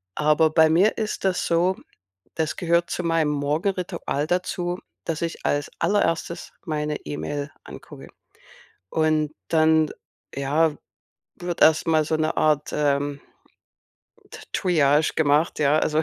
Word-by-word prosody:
Aber 155 +1 +3
bei 160 0 +4
mir 190 +7 +3
ist 215 -1 -3
das 190 -2 0
so, 175 +3 +2 0.6
das 160 -2 -2
gehört 170 0 +1
zu - - -2
meinem 165 -2 +1
Morgenritual 155 +1 -2
dazu, 180 0 -2 0.3
dass 165 -2 -3
ich 165 -1 -4
als 145 0 0
Allererstes 170 -4 0
meine 150 -2 -2
E-Mail 80 - -4
angucke. - - -12 0.8
Und 155 -1 +1 0.2
dann, 160 -1 +3 0.4
ja, 145 +3 +1 0.6
wird 175 -1 -5
erst 160 0 +5
mal 155 -1 +3
so 160 +1 0
'ne 155 0 -1
Art, 150 -1 +2
ähm, 145 -1 0 1.1
T - - -10
Triage 155 -4 +2
gemacht, 150 +1 +2
ja, 150 0 +3
also, 155 0 +1
155 Hz, 125 wpm, -24 LUFS, 150-170 Hz, 1.1 s, erst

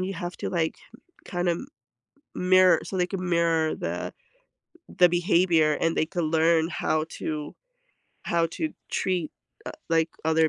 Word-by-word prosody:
you 190 +1 -3
have 175 0 -5
to - - -3
like, 165 -3 -1 0.5
kinda 175 -1 -1
m 170 +10 -5 0.7
mirror 185 -2 +5
so, 190 - -5
they 180 -1 +2
can 185 -1 -4
mirror 165 -2 +2
the - - -4 0.8
the 180 -1 +4
behavior 170 -3 +3
and 165 0 +1
they - - +2
can 175 0 -2
learn 160 +1 +3
how 155 -2 -1
to 150 -1 -4 0.7
how 170 -1 +1
to 315 - -4 0.2
treat, 180 -4 -1 0.4
uh, - - -4 0.2
like, 165 0 +3 0.2
other 160 0 +3
170 Hz, 150 wpm, -26 LUFS, 160-180 Hz, 0.8 s, mirror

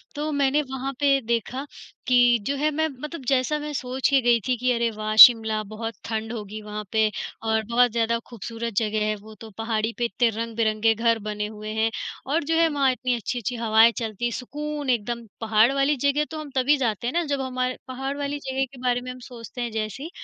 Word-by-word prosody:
तो 300 +1 -2
मैंने 285 +1 +2
वहाँ 265 +1 -3
पे 280 -1 +4
देखा 235 +4 -2 0.4
कि 245 -1 +5
जो 280 - 0
है, 300 +2 +1
मैं 315 +2 0
मतलब 300 +1 -6
जैसा 270 +3 +2
मैं 300 0 -5
सोच 260 0 -1
के 275 -1 +4
गई 240 -1 +4
थी 255 - +2
कि 250 +2 +1
अरे, 235 0 +1
वाह! 215 0 -3
शिमला, 220 -3 +9
बहुत 220 +2 -6
ठंड 220 0 -3
होगी 215 -1 -6
वहाँ 210 0 -6
पे 220 -1 +3 0.3
और 220 0 +1
बहुत 245 0 +4
ज़्यादा 230 0 +1
खूबसूरत 230 0 -6
जगह 215 -1 +1
है 215 - 0
वो, 215 +1 -13
तो 225 0 -11
पहाड़ी 225 0 -1
पे 240 - 0
इतने 235 0 +1
रंग-बिरंगे 225 0 0
घर 230 0 +2
बने 210 0 -3
हुए 215 0 -8
हैं, 220 +1 +1 0.4
और 300 +4 0
जो 325 +2 0
है 330 - +5
वहाँ 280 -3 +2
इतनी 250 0 -1
अच्छी-अच्छी 240 +1 -3
हवाएँ 225 0 +5
चलती 225 -1 -3
हैं, 240 - 0
सुकून 295 +3 -5
एकदम। 235 0 -1 0.2
पहाड़ 225 +2 +4
वाली 275 +2 +2
जगह 290 +2 +2
तो 315 - -5
हम 295 - -8
तभी 270 +3 +3
जाते 235 -3 -1
हैं 250 - -2
ना, 345 0 +1
जब 280 -3 -2
हमार 255 -1 -2
पहाड़ 270 +2 -4
वाली 285 0 -3
जगह 265 0 0
के - - -12
बारे 245 -1 +1
में 250 0 -6
हम 255 - -10
सोचते 245 0 -9
हैं 235 - -3
जैसे 220 +5 -4
ही, 325 - -6
240 Hz, 220 wpm, -24 LUFS, 220-270 Hz, 0.4 s, शिमला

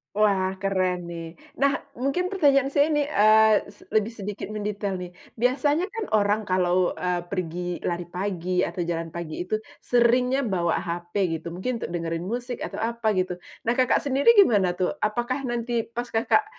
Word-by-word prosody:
Wah, 195 -3 +2
keren 185 -3 0
nih. 165 -1 -7 0.2
Nah, 275 0 +3 0.2
mungkin 275 +9 0
pertanyaan 280 -8 +3
saya 285 +1 +3
ini, 300 -2 +1
eee, 215 -2 +5
se - - -24
lebih 215 +1 +1
sedikit 205 -1 -5
mendetail 205 -1 -3
nih. 180 - -6 0.3
Biasanya 290 - +2
kan 450 -2 -4
orang 210 0 +2
kalau, 185 -1 +2
eee, 180 -1 -2
pergi 175 -1 -4
lari 175 0 -2
pagi 180 0 -2
atau 170 0 -2
jalan 165 -1 -3
pagi 170 0 -5
itu 200 +4 -1 0.3
seringnya 250 +2 +3
bawa 175 -5 0
HP 175 0 -5 0.3
gitu, 170 - -6
mungkin 225 +7 -3
untuk - - -4
dengerin 165 0 -3
musik 245 +1 -4
atau - - -5
apa 230 0 -1
gitu. 185 0 0 0.3
Nah, 230 - +2
Kakak 255 +2 +2
sendiri 280 - +4
gimana 200 - +5
tuh? 185 - 0
Apakah 240 +5 -1
nanti 235 0 -1
pas 235 +2 -5
Kakak 230 - +3
210 Hz, 165 wpm, -25 LUFS, 180-245 Hz, 0.3 s, eee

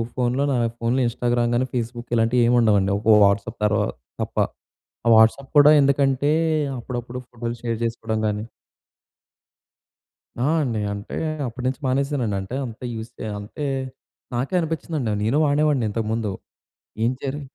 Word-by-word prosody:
ఫోన్‌లో, 125 +2 +1
నా - - +1 0.2
ఫోన్‌లో 120 +3 +1
ఇన్‌స్టాగ్రామ్ 120 0 0
గానీ, 130 +2 +1
ఫేస్‌బుక్ 120 0 -4
ఇలాంటివి 115 +2 +3
ఏమి 120 +1 +4
ఉండవండి. 100 -3 +3
ఒక 110 0 +5
వాట్సాప్ 100 +1 0
తర్వాత 105 -1 +1 0.3
తప్ప. - - -5 0.7
ఆ - - +1
వాట్సాప్ 115 +5 +4
కూడా 145 +1 +8
ఎందుకంటే, 140 +1 +2 0.5
అప్పుడప్పుడు 120 +1 -5
ఫోటోలు 120 0 -5
షేర్ 115 -2 -1
చేసుకోవడం 110 -1 -2
గానీ 105 +1 -2 2.0
ఆ! - - +2 0.2
అండి. 115 -5 -1
అంటే 100 0 -6 0.3
అప్పట్నించి 125 +4 -3
మానేశానండి. 130 -5 0
అంటే, 95 +6 -7
అంత 115 -2 -10
యూజ్ 110 +1 -6
చె - - -5
అంటే, 125 +8 -5 0.7
నాకే 130 +9 -2
అనిపిచ్చిందండి. 155 -7 -2
నేను 115 +7 +2
వాడేవాడిని 145 -4 +2
ఇంతకు 110 0 -2
ముందు. 110 -3 -1 0.7
ఏం 120 - +3
జరి 140 +2 -3
120 Hz, 135 wpm, -23 LUFS, 110-135 Hz, 2.0 s, కూడా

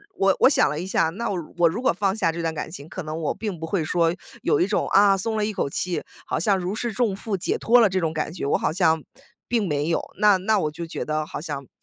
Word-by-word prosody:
我 195 -1 +3
我 - - +7
想 280 - +4
了 150 +2 -2
一 180 - -4
下， 160 -4 +2
那 210 +8 -4
我 190 - -1 0.2
我 170 -1 +5
如 220 +9 -4
果 - - +3
放 195 +2 0
下 170 -6 +1
这 170 +1 -5
段 165 -1 -1
感 160 - -5
情， 155 -2 -9
可 185 - -6
能 155 +1 -5
我 155 - -1
并 205 -7 -4
不 165 - -5
会 170 -2 0
说 165 0 +2 0.3
有 - - +2
一 180 - +4
种， 205 - 0
啊， 200 0 +5
松 220 +3 -2
了 210 - +1
一 215 - -2
口 140 - -1
气， 180 +4 -2 0.2
好 - - -2
像 195 +3 +2
如 185 +2 -3
释 235 +1 -2
重 215 -2 0
负 200 -1 -3
解 - - -1
脱 240 +2 +5
了 225 - +5
这 185 0 0
种 165 -2 0
感 155 +1 -3
觉， 180 - -6
我 - - +2
好 - - -1
像 160 -4 +2 0.4
并 225 -5 0
没 150 +1 -1
有， 165 - +1 0.2
那 205 -2 +5
那 210 +3 +1
我 150 -3 -1
就 165 +2 -6
觉 - - -5
得 155 0 -2
好 - - -6
像 145 -4 -6
180 Hz, 305 characters per minute, -24 LUFS, 160-205 Hz, 0.4 s, 我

